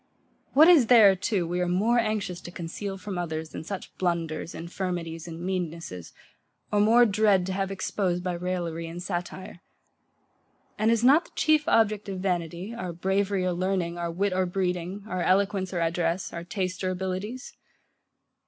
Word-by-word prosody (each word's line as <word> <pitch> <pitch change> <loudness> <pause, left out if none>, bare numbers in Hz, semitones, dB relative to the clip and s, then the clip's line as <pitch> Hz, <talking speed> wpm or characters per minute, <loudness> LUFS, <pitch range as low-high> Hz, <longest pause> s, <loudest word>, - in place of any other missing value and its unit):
What 305 +4 +8
is 320 -10 +7
there 220 -5 +7
too 190 -1 -1
we 175 +1 -2
are 180 - +1
more 210 +7 +2
anxious 210 -5 -2
to - - -8
conceal 190 +3 -5
from 190 -1 -5
others 160 -2 -4
than - - -7
such 190 +3 -7
blunders, 170 -3 -2
infirmities, 170 -1 -4
and 165 -1 -7
meannesses, 170 - -4 0.6
or 210 - +2
more 230 +4 +6
dread 205 -3 +3
to 190 - -3
have 195 0 -1
exposed 185 -2 -1
by 180 -1 -1
raillery 170 -2 -3
and 165 +1 -7
satire? 175 0 -5 1.1
And 215 +1 +1
is 230 0 +2
not 285 +7 +6
the - - -18
chief 310 -1 +3
object 215 - +2
of 190 - -4
vanity, 180 +2 -2
our 185 -7 -5
bravery 190 +2 0
or 180 - +1
learning, 175 -1 -1
our 170 0 -2
wit 190 +3 0
or 185 0 +1
breeding, 180 +1 -2
our 185 -3 -2
eloquence 190 0 +1
or 175 -2 -2
address, 170 +2 -1
our 170 - -5
taste 185 0 -3
or 185 - +1
abilities? 190 +7 -4
185 Hz, 170 wpm, -27 LUFS, 175-200 Hz, 1.1 s, What